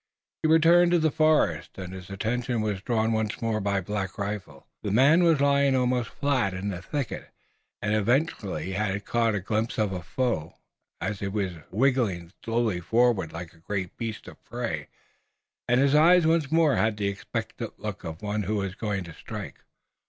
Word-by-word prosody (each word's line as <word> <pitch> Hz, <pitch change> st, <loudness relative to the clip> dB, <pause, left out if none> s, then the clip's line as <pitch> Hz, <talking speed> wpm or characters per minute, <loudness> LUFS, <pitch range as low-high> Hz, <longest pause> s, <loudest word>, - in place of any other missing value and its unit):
He 155 Hz, -, +1 dB
returned 170 Hz, +2 st, +6 dB
to -, -, +6 dB
the 160 Hz, -2 st, +2 dB
forest, 150 Hz, -, +2 dB
and 95 Hz, -1 st, -6 dB
his 95 Hz, -1 st, -9 dB
attention 115 Hz, +4 st, -1 dB
was 105 Hz, -3 st, -2 dB
drawn 110 Hz, 0 st, +1 dB
once 110 Hz, -1 st, -1 dB
more 110 Hz, -2 st, -1 dB
by 100 Hz, -1 st, 0 dB
Black 95 Hz, 0 st, -4 dB
Rifle. 100 Hz, -8 st, -5 dB, 0.2 s
The 105 Hz, -, -3 dB
man 135 Hz, -, +5 dB
was 165 Hz, -4 st, +4 dB
lying 140 Hz, -1 st, +3 dB
almost 125 Hz, -1 st, +1 dB
flat 130 Hz, -10 st, 0 dB
in 95 Hz, +2 st, -3 dB
the 90 Hz, -3 st, -5 dB
thicket, 140 Hz, +6 st, -4 dB, 0.5 s
and 105 Hz, 0 st, +1 dB
evidently 110 Hz, -, 0 dB
he 95 Hz, -, -4 dB
had 100 Hz, 0 st, -2 dB
caught 115 Hz, -2 st, +1 dB
a -, -, 0 dB
glimpse 110 Hz, +4 st, -2 dB
of 105 Hz, -3 st, +1 dB
a 90 Hz, -, -4 dB
foe, 85 Hz, -3 st, -2 dB, 0.4 s
as 105 Hz, -, -3 dB
he 100 Hz, -, -3 dB
was 100 Hz, -2 st, -1 dB, 0.2 s
writhing 105 Hz, -7 st, +1 dB
slowly 115 Hz, -5 st, 0 dB
forward 115 Hz, -3 st, +2 dB
like 85 Hz, +1 st, -7 dB
a -, -, -21 dB
great 95 Hz, +1 st, -4 dB
beast 115 Hz, -3 st, -5 dB
of -, -, -13 dB
prey, -, -, -4 dB, 0.8 s
and 125 Hz, +1 st, +3 dB
his 140 Hz, +1 st, +3 dB
eyes 165 Hz, +3 st, +6 dB
once 160 Hz, -3 st, +2 dB
more 160 Hz, -3 st, +4 dB
had 110 Hz, -1 st, +1 dB
the 100 Hz, -1 st, 0 dB
expectant 100 Hz, 0 st, -5 dB
look -, -, -5 dB
of 80 Hz, +4 st, -7 dB
one 105 Hz, +1 st, -1 dB
who 105 Hz, 0 st, -1 dB
is 95 Hz, -1 st, -3 dB
going 100 Hz, -2 st, -2 dB
to 85 Hz, -2 st, -10 dB
strike. -, -, -8 dB
110 Hz, 185 wpm, -27 LUFS, 95-130 Hz, 0.8 s, returned